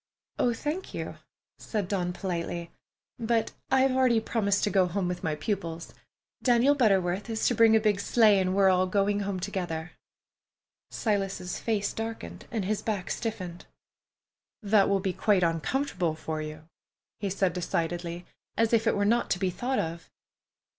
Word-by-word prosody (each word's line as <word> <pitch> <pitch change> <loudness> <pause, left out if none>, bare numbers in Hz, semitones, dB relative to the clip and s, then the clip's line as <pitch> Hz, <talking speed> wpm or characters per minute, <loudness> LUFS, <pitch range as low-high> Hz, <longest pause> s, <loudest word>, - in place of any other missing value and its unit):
"Oh, 245 - +3
thank 300 +10 -4
you," - - -5 0.4
said 210 -5 -3
Dawn 180 -2 -1
politely, 170 -2 -4 0.5
"but 230 -1 +1 0.2
I've 265 0 +4
already 255 -3 +3
promised 205 -3 0
to 205 - +1
go 190 -2 +4
with 180 0 -2
my 160 -3 0
pupils. 170 -2 -4 0.5
Daniel 250 +3 +4
Butterworth 195 -6 +2
is 220 -1 -1
to - - +2
bring 225 -1 +6
a - - +6
big 210 -2 +1
sleigh, 210 -1 +4
and 185 0 0
we 200 - +3
are 190 - +7
all 185 0 +3
going 200 +2 +1
home 200 -2 -2
together." 175 -4 -4 1.0
Silas's 195 -4 -2
face 210 -3 -1
darkened 225 0 -6
and 220 -5 -2
his 210 +1 -1
back 205 -5 -3
stiffened. 185 -7 -4 1.0
"That 205 -1 +4
will 195 -1 +2
be 190 -1 -1
quite 200 -3 +2
uncomfortable 175 - 0
for 155 0 -4
you," 155 0 -8 0.5
he 200 - -2
said 190 -2 +1
decidedly, 175 0 -2 0.3
as 225 0 +2
if 225 0 +3
it - - +3
were 200 - +2
not 235 +3 +2
to - - +1
be 185 0 0
thought 250 +8 -2
of. 165 0 -3
200 Hz, 160 wpm, -28 LUFS, 180-225 Hz, 1.0 s, are